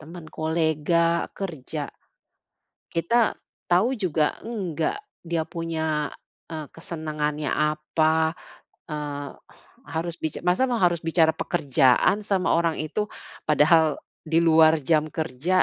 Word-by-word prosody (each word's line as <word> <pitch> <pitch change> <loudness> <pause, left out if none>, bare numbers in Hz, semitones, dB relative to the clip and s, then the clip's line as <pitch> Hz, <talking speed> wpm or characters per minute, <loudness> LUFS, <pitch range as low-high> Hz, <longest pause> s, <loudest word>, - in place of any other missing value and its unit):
teman 165 +2 -10
kolega, 160 +1 +1
kerja. 170 -10 -5 1.0
Kita 220 +8 +2 0.4
tahu 180 +7 +4
juga 160 -6 +1
enggak, 195 - -2 0.3
dia 165 -1 0
punya 160 -3 -2 0.4
e 160 - -4 0.2
kesenangannya 155 -3 -3
apa? 155 +1 +1 0.6
Eee, 145 -2 -4 0.6
harus 165 +1 -2
bica 155 - -2
masa 185 +9 +3 0.2
harus 175 -1 0
bicara 160 -1 +4
pekerjaan 140 +4 +2
sama 190 -3 +1
orang 165 -1 +1
itu. 155 +7 -3 0.5
Padahal 155 0 +4 0.2
di 160 +1 +2
luar 160 -1 +6
jam 155 -2 +3
kerja. 160 +3 +1
160 Hz, 105 wpm, -25 LUFS, 155-170 Hz, 1.0 s, luar